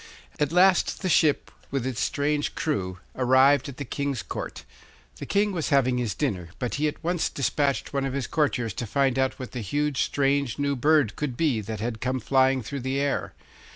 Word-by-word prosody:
At 150 -1 +1
last 185 +2 +3
the 185 - 0
ship, 155 -3 +3 0.2
with 135 -2 -2
its 130 -3 -3
strange 145 0 0
crew, 95 - -2 0.2
arrived 130 +2 +4
at 135 - -9
the 140 - -5
King's 140 -1 -3
Court. - - -6 0.5
The - - -7
King 205 +1 +2
was 170 -5 -2
having 130 -3 +3
his 120 -4 -2
dinner, 95 - -2
but 125 - -3
he 155 - +3
at 150 - -5
once 175 0 0
despatched 140 +1 -1
one 140 -1 0
of 135 - -3
his 140 -2 -2
courtiers 125 -8 0
to 120 - -4
find 135 +2 +1
out 130 0 0
what 130 - -7
the 125 - -5
huge, 145 +6 -1
strange 140 -3 +1
new 140 -1 0
bird 145 -2 +3
could 135 -5 -3
be 140 -9 +1
that 105 0 -6
had 115 -1 -3
come 130 +1 -1
flying 130 +2 +2
through 140 +5 -5
the 130 +2 -1
air. 140 0 -1
135 Hz, 200 wpm, -26 LUFS, 125-145 Hz, 0.5 s, arrived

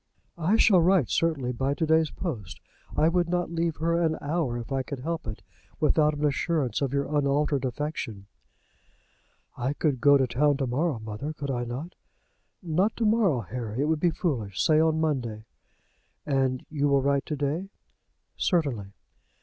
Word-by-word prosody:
"I 175 +6 +2
shall 195 -5 +5
write, 175 - +3
certainly, 150 -7 +1
by 135 +3 -1
to 160 - 0
day's 160 0 +3
post. 125 - -5 0.4
I 155 - +4
would 175 0 +1
not 175 -1 -1
leave 165 -1 -1
her 170 +1 0
an 160 -2 +1
hour, 145 -5 -1
if 120 +3 -7
I 135 -1 +1
could 130 0 -6
help 165 -1 -3
it, 110 - -6 0.4
without 150 0 +3
an 150 +1 -1
assurance 145 -2 0
of 135 -2 0
your 140 +2 -1
unaltered 140 -1 +1
affection." 125 -6 -4 1.3
"I 130 +3 -1
could 145 -4 -1
go 145 0 +7
to 135 - +2
town 140 +4 +2
to 135 - -1
morrow, 140 +3 0
mother; 110 +7 -5
could 140 -2 -4
I 120 -1 -2
not?" 135 +9 -6 0.7
"Not 180 +6 +1
to 230 - 0
morrow, 210 - +3
Harry. 115 +4 -4
It - - +2
would 155 0 +1
be 175 - +3
foolish. 125 - -2
Say 155 -1 +4
on 160 0 +2
Monday." 120 -9 -2 0.8
"And 135 -3 0
you 145 -2 +1
will 140 -1 +3
write 140 0 +1
to 150 - -2
day?" 150 +7 -2 0.7
"Certainly." 130 - 0
145 Hz, 175 wpm, -27 LUFS, 130-160 Hz, 1.3 s, go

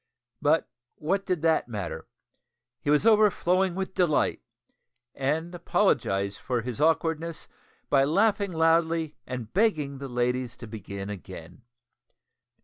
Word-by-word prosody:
But 155 +2 +3 0.3
what 195 +6 -1
did 180 -4 -1
that 165 -5 +2
matter? 105 -7 -5 0.7
He - - -3
was 150 +6 +3
overflowing 190 -4 +3
with 190 0 -3
delight, 175 -6 +1 0.7
and 155 +6 -1
apologised 100 - 0
for 125 -2 -1
his 125 +3 -5
awkwardness 165 +1 0 0.4
by 135 -1 +4
laughing 200 +5 +2
loudly 165 -1 +2
and 125 -4 -6
begging 155 -10 +1
the 135 -1 -6
ladies 125 0 -1
to - - -9
begin 100 -2 -7
again. 100 - -10
155 Hz, 120 wpm, -27 LUFS, 125-175 Hz, 0.7 s, by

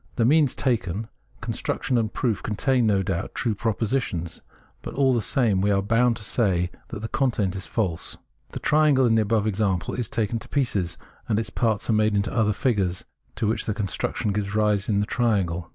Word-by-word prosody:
The 115 - +2
means 145 0 +4
taken, 110 -4 -1 0.3
construction 130 - -2
and 110 -2 +1
proof, 115 -6 -1
contain, 120 +2 +1
no 100 -2 +2
doubt, 95 -3 -3
true 115 -3 0
propositions; 105 -6 -2 0.4
but - - -7
all 135 -2 +3
the 120 - +1
same 110 -7 +1
we 100 - +2
are 100 -1 +2
bound 115 +3 +2
to - - -8
say 90 -5 +1 0.2
that 100 - -7
the 110 - -3
content 110 -7 0
is 95 0 -5
false. 95 -8 -2 0.3
The - - -6
triangle 150 -3 +4
in 115 - +3
the 110 - +4
above 110 0 +1
example 100 -4 0
is 120 -3 -3
taken 115 0 -1
to - - -13
pieces, 100 - -1 0.3
and 110 -1 +2
its 110 -1 -4
parts 110 -3 0
made 110 -1 +2
into 100 +2 0
other 110 -3 +2
figures 100 -6 0 0.3
to - - -2
which 110 +2 -1
the 105 - -1
construction 105 0 -2
gives 100 0 -2
rise 105 -1 +1
in 100 -1 +2
the - - 0
triangle. 95 -9 0
110 Hz, 195 wpm, -24 LUFS, 100-120 Hz, 0.4 s, means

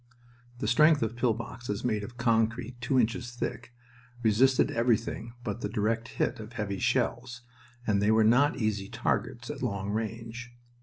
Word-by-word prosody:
The 110 - -3
strength 150 +4 +5
of 110 - +1
the 115 - -14
pill 120 -2 +2
boxes 115 -1 -5
made 110 -4 0
of 120 +4 -9
concrete 120 +1 0
two 130 +1 +2
inches 120 +1 0
thick 120 -1 -4 0.5
resisted 125 +4 +4
everything 115 0 0
but 110 +1 -4
the - - -2
direct 115 +1 0
hit 125 - 0
of 110 +2 -9
heavy 100 -5 -3
shells, 125 +1 0 0.4
and 100 -2 +2
they 105 - +3
were 110 0 +5
not 125 +7 +4
easy 105 -3 -1
targets 115 +1 -2
at 150 - -8
long 100 -5 -2
range. 115 +3 -5
115 Hz, 165 wpm, -29 LUFS, 110-125 Hz, 0.5 s, strength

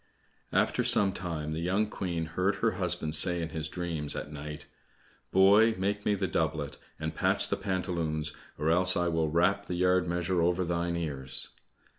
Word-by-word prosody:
After - - +1
some 95 -2 +6
time 80 -5 -4
the 80 - -3
young 95 +5 +1
Queen 90 -5 -3
heard 90 +5 -1
her - - +1
husband 75 0 -1
say 85 +3 +4
in 80 -1 -3
his 80 0 -3
dreams 80 -5 -3
at 75 - -6
night, 75 0 -7 0.7
"Boy, 105 +4 +5
make 100 +2 -2
me 105 - +3
the 95 -1 -1
doublet, 80 -5 -2 0.2
and 80 0 -3
patch - - +2
the - - +1
pantaloons, 80 -5 -2 0.2
or 75 +2 +1
else 95 +2 +3
I 85 0 +1
will 80 -2 0
rap 90 +5 +1
the 90 - -3
yard 90 0 +2
measure 85 +1 0
over 90 +2 +1
thine 85 0 -1
ears." 65 -5 -1
85 Hz, 175 wpm, -29 LUFS, 80-95 Hz, 0.7 s, some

